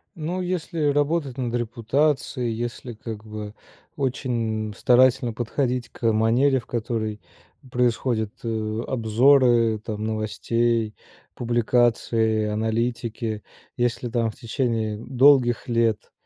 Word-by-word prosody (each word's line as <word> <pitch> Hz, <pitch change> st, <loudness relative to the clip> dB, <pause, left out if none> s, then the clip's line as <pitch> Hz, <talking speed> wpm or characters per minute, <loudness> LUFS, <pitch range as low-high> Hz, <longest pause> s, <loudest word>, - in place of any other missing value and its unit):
Но 170 Hz, +3 st, -3 dB
если 175 Hz, -3 st, -2 dB
работать 145 Hz, -2 st, 0 dB
над 120 Hz, -2 st, -2 dB
репутацией, 120 Hz, +2 st, 0 dB
если, 120 Hz, +1 st, -5 dB
как 110 Hz, -1 st, -8 dB
бы, 105 Hz, -1 st, -7 dB, 0.4 s
очень 115 Hz, -6 st, -2 dB
старательно 125 Hz, -1 st, +4 dB
подходить 120 Hz, +1 st, -2 dB
к 115 Hz, -2 st, 0 dB
манере, 120 Hz, +5 st, +3 dB
в -, -, -20 dB
которой 110 Hz, -2 st, -3 dB, 0.5 s
происходят, 120 Hz, -3 st, 0 dB
э, 110 Hz, -1 st, -2 dB
обзоры 120 Hz, -1 st, +4 dB
там 110 Hz, 0 st, -5 dB
новостей, 110 Hz, +1 st, 0 dB, 0.4 s
публикации, 115 Hz, -2 st, +1 dB
аналитики. 110 Hz, 0 st, -2 dB, 0.3 s
Если 120 Hz, 0 st, -1 dB
там 115 Hz, -1 st, 0 dB
в -, -, -15 dB
течение 115 Hz, -3 st, -1 dB
долгих 130 Hz, 0 st, +3 dB
лет 115 Hz, -2 st, 0 dB
115 Hz, 105 wpm, -24 LUFS, 110-125 Hz, 0.5 s, старательно